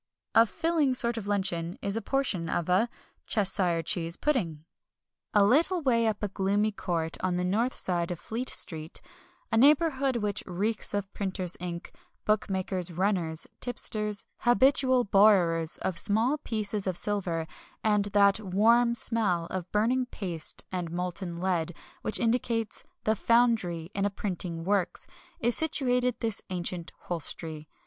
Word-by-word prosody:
A 225 Hz, +1 st, +6 dB
"filling" 320 Hz, -2 st, +1 dB
sort 235 Hz, -1 st, +1 dB
of 220 Hz, -3 st, -5 dB
luncheon 180 Hz, -4 st, -1 dB
is 200 Hz, +1 st, -2 dB
a 225 Hz, -, -1 dB
portion 205 Hz, -9 st, -1 dB
of 170 Hz, -, -1 dB
a 195 Hz, +6 st, +3 dB, 0.4 s
Cheshire 185 Hz, -5 st, +1 dB
Cheese 170 Hz, -1 st, -1 dB
Pudding. 170 Hz, -, -1 dB, 0.7 s
A 205 Hz, -2 st, +5 dB
little 330 Hz, -, +4 dB
way 230 Hz, -4 st, +3 dB
up 215 Hz, -1 st, -2 dB
a -, -, +1 dB
gloomy 200 Hz, +2 st, 0 dB
court 170 Hz, -5 st, -3 dB
on 185 Hz, -1 st, 0 dB
the 180 Hz, -, -1 dB
north 220 Hz, +8 st, 0 dB
side 175 Hz, -1 st, 0 dB
of 175 Hz, -, -3 dB
Fleet 240 Hz, +3 st, -4 dB
Street 160 Hz, -1 st, -3 dB, 0.5 s
a 225 Hz, -, +2 dB
neighbourhood 275 Hz, 0 st, +4 dB
which 210 Hz, -3 st, -1 dB
reeks 205 Hz, +4 st, -1 dB
of 200 Hz, -1 st, -3 dB
printers' 185 Hz, -3 st, -3 dB
ink, 175 Hz, -1 st, -6 dB, 0.3 s
bookmakers' 190 Hz, -4 st, 0 dB
"runners," 175 Hz, -3 st, 0 dB
tipsters, 210 Hz, -4 st, 0 dB
habitual 260 Hz, +2 st, +3 dB
borrowers 185 Hz, -6 st, +4 dB
of 175 Hz, -3 st, -1 dB
small 230 Hz, -, +1 dB
pieces 210 Hz, -4 st, -3 dB
of 185 Hz, -2 st, -1 dB
silver, 180 Hz, -6 st, -1 dB, 0.4 s
and 210 Hz, -2 st, +2 dB
that 200 Hz, 0 st, +3 dB
"warm" 225 Hz, +5 st, +3 dB
smell 210 Hz, -8 st, +1 dB
of 185 Hz, -1 st, -5 dB
burning 245 Hz, +5 st, +1 dB
paste 175 Hz, -9 st, -3 dB
and 180 Hz, -3 st, -3 dB
molten 180 Hz, 0 st, -4 dB
lead 175 Hz, -2 st, -1 dB, 0.3 s
which -, -, +2 dB
indicates 230 Hz, -1 st, 0 dB, 0.2 s
the 220 Hz, -, +2 dB
"foundry" 220 Hz, -8 st, +1 dB
in 195 Hz, -, -1 dB
a 205 Hz, -, +2 dB
printing 180 Hz, -4 st, -4 dB
works 185 Hz, -1 st, 0 dB, 0.3 s
is 240 Hz, +1 st, +1 dB
situated 250 Hz, -6 st, +1 dB
this 225 Hz, -3 st, +1 dB
ancient 175 Hz, -1 st, -3 dB
hostelry. 160 Hz, -2 st, -3 dB
200 Hz, 145 wpm, -28 LUFS, 175-230 Hz, 0.7 s, A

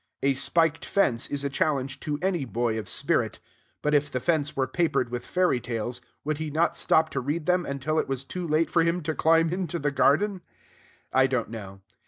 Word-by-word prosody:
A 140 Hz, 0 st, +4 dB
spiked 160 Hz, +4 st, +1 dB
fence 125 Hz, -13 st, +1 dB
is 140 Hz, -1 st, -2 dB
a 140 Hz, -, 0 dB
challenge 135 Hz, -2 st, 0 dB
to 150 Hz, -3 st, -3 dB
any 185 Hz, -5 st, +1 dB
boy 115 Hz, -2 st, -1 dB
of 105 Hz, -, -7 dB
spirit. -, -, +1 dB, 0.5 s
But 150 Hz, -, +1 dB
if 145 Hz, 0 st, +2 dB
the 125 Hz, -, -1 dB
fence 155 Hz, 0 st, 0 dB
were 135 Hz, -, +1 dB
papered 130 Hz, -2 st, 0 dB
with 120 Hz, 0 st, -4 dB
fairy 180 Hz, -8 st, +1 dB
tales, 120 Hz, +1 st, -4 dB, 0.2 s
would 155 Hz, 0 st, -2 dB
he 155 Hz, -1 st, -3 dB
not 160 Hz, +3 st, +1 dB
stop 160 Hz, 0 st, +3 dB
to 135 Hz, -, -1 dB
read 150 Hz, +5 st, -2 dB
them 180 Hz, 0 st, +1 dB
until 140 Hz, +3 st, -1 dB
it -, -, -1 dB
was 135 Hz, -1 st, -2 dB
too 180 Hz, +5 st, -5 dB
late 155 Hz, +1 st, +1 dB
for 170 Hz, -, +4 dB
him 170 Hz, +1 st, +1 dB
to 160 Hz, +1 st, -1 dB
climb 165 Hz, +1 st, +3 dB
into 180 Hz, -2 st, -2 dB
the 145 Hz, -2 st, -1 dB
garden? 185 Hz, +8 st, +2 dB, 0.7 s
I 130 Hz, 0 st, +5 dB
don't 125 Hz, -4 st, -2 dB
know. 100 Hz, -4 st, -8 dB
145 Hz, 210 wpm, -26 LUFS, 130-165 Hz, 0.7 s, I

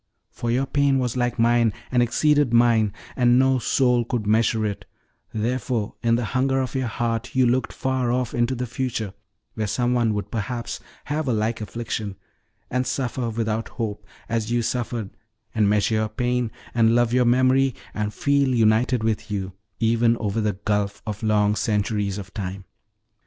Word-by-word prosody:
For 120 Hz, -, -4 dB
your 125 Hz, +3 st, +1 dB
pain 140 Hz, 0 st, +2 dB
was 125 Hz, -2 st, -1 dB
like 120 Hz, 0 st, 0 dB
mine, 115 Hz, -1 st, +3 dB, 0.2 s
and 125 Hz, -1 st, +3 dB
exceeded 145 Hz, +2 st, +3 dB
mine, 115 Hz, -3 st, +4 dB, 0.2 s
and 125 Hz, -1 st, +4 dB
no 130 Hz, 0 st, +4 dB
soul 125 Hz, 0 st, +2 dB
could 115 Hz, -2 st, -2 dB
measure 110 Hz, +1 st, +2 dB
it, 100 Hz, -2 st, -4 dB, 0.5 s
therefore 115 Hz, 0 st, -1 dB
in 115 Hz, -1 st, +3 dB
the 120 Hz, 0 st, -1 dB
hunger 135 Hz, +1 st, +2 dB
of 130 Hz, -2 st, -2 dB
your 130 Hz, -2 st, -1 dB
heart 115 Hz, +2 st, -2 dB
you 130 Hz, -1 st, +4 dB
looked 125 Hz, +1 st, +1 dB
far 130 Hz, -2 st, -1 dB
off 125 Hz, -1 st, -1 dB
into 120 Hz, +2 st, +1 dB
the 125 Hz, +1 st, -2 dB
future, 115 Hz, -4 st, -3 dB, 0.4 s
where 110 Hz, -1 st, -2 dB
some 120 Hz, +4 st, 0 dB
one 115 Hz, -3 st, +2 dB
would 105 Hz, -, -4 dB
perhaps 115 Hz, +2 st, -3 dB, 0.3 s
have 150 Hz, 0 st, -2 dB
a 125 Hz, -, +2 dB
like 110 Hz, +1 st, -1 dB
affliction, 110 Hz, -2 st, -4 dB, 0.6 s
and 125 Hz, +1 st, 0 dB
suffer 125 Hz, -2 st, -2 dB
without 110 Hz, 0 st, -2 dB
hope, 105 Hz, -3 st, -3 dB, 0.2 s
as 115 Hz, -1 st, -1 dB
you 120 Hz, -1 st, +1 dB
suffered, 120 Hz, -4 st, -2 dB, 0.4 s
and 105 Hz, -2 st, +3 dB
measure 105 Hz, +1 st, +2 dB
your 110 Hz, 0 st, +1 dB
pain, 125 Hz, +1 st, -1 dB, 0.2 s
and 115 Hz, -1 st, +4 dB
love 120 Hz, -1 st, +2 dB
your 125 Hz, 0 st, +4 dB
memory, 130 Hz, +1 st, +3 dB, 0.2 s
and 105 Hz, 0 st, -2 dB
feel 140 Hz, +4 st, +2 dB
united 115 Hz, +2 st, +3 dB
with 110 Hz, 0 st, -1 dB
you, 95 Hz, -2 st, -3 dB, 0.3 s
even 115 Hz, +1 st, +3 dB
over 110 Hz, 0 st, -1 dB
the 105 Hz, -1 st, 0 dB
gulf 100 Hz, +1 st, -2 dB
of 105 Hz, -1 st, -5 dB
long 105 Hz, -1 st, +2 dB
centuries 105 Hz, -2 st, 0 dB
of 95 Hz, -1 st, -8 dB
time. 95 Hz, -2 st, -5 dB
115 Hz, 175 wpm, -23 LUFS, 110-125 Hz, 0.6 s, mine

